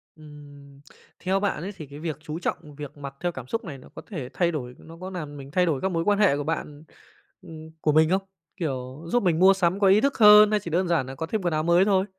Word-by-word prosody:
Ừm, 145 -2 -14 0.4
theo 190 +2 0
bạn 200 -6 -1
ấy 195 - -4
thì 155 - -8
cái 145 +1 -11
việc 160 -3 -4
chú 155 +1 -6
trọng 150 -4 -4
việc 145 0 -9
mặc 140 -1 -8
theo 175 0 -1
cảm 130 -6 -9
xúc 230 - -3
này 145 -6 -7
nó 130 - -16
có - - -8
thể 145 - -6
thay 175 -1 +1
đổi, 125 -6 -5
nó 165 +1 -14
có 185 - -5
làm 155 -6 -7
mình 135 0 -10
thay 180 +3 +2
đổi 155 -6 -1
các 190 - -1
mối 165 -1 -1
quan 205 +2 +2
hệ 195 -9 +4
của 145 - -3
bạn 150 -1 -4 0.6
ừm, 160 -3 -11
của 150 - +2
mình 155 +1 +4
không? 190 +2 +2 0.4
Kiểu, 135 -4 -5
giúp 245 +6 +1
mình 170 -4 +2
mua 190 +2 +7
sắm 185 0 0
có 200 - +4
ý 195 +3 +5
thức 280 +2 0
hơn 210 0 +8
hay 210 - +2
chỉ 175 -4 -8
đơn 180 +3 +1
giản 170 -6 +1
nà 130 +1 -8
có 160 - -4
thêm 215 +5 -2
quần 175 -3 -1
áo 155 0 0
mới 170 +3 +4
thôi? 195 -2 +2
165 Hz, 275 wpm, -25 LUFS, 145-190 Hz, 0.6 s, hơn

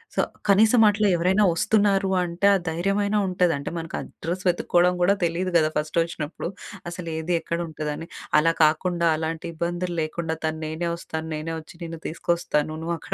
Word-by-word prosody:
So, - - +3 0.3
కనీసం 220 +4 +6
అట్లా 210 0 +2
ఎవరైనా 185 +5 +3
వస్తున్నారు 200 +2 +2
అంటే, 175 +3 0
ఆ - - +4
ధైర్యమైనా 195 +5 0
ఉంటది. 180 -2 +2
అంటే, 140 - -5
మనకు 165 0 -5
అడ్రస్ 175 +3 -5
వెతుక్కోవడం 175 0 +2
గూడా 180 +3 +5
తెలీదు 175 +2 -1
కదా! 155 -2 +3
ఫస్ట్ 150 +2 -2
వచ్చినప్పుడు. 165 -2 -5 0.4
అసలు 175 0 -7
ఏది 160 +2 -2
ఎక్కడ 170 +1 -3
ఉంటుంది 155 -1 -4
అని. 165 - -8 0.3
అలా 165 +2 +3
కాకుండా, 170 +3 +2
అలాంటి 160 +1 -3
ఇబ్బందులు 175 +2 -2
లేకుండా 160 +1 -2
తను, 155 0 -2
"నేనే 160 +2 -2
వస్తాను. 160 -1 -6
నేనే 155 +2 -4
వచ్చి 155 - -15
నిన్ను 165 -1 -7
తీసుకొస్తాను. 160 -2 -1
నువ్వు 170 +1 -1
అక్కడ - - -6
170 Hz, 170 wpm, -24 LUFS, 160-180 Hz, 0.4 s, కనీసం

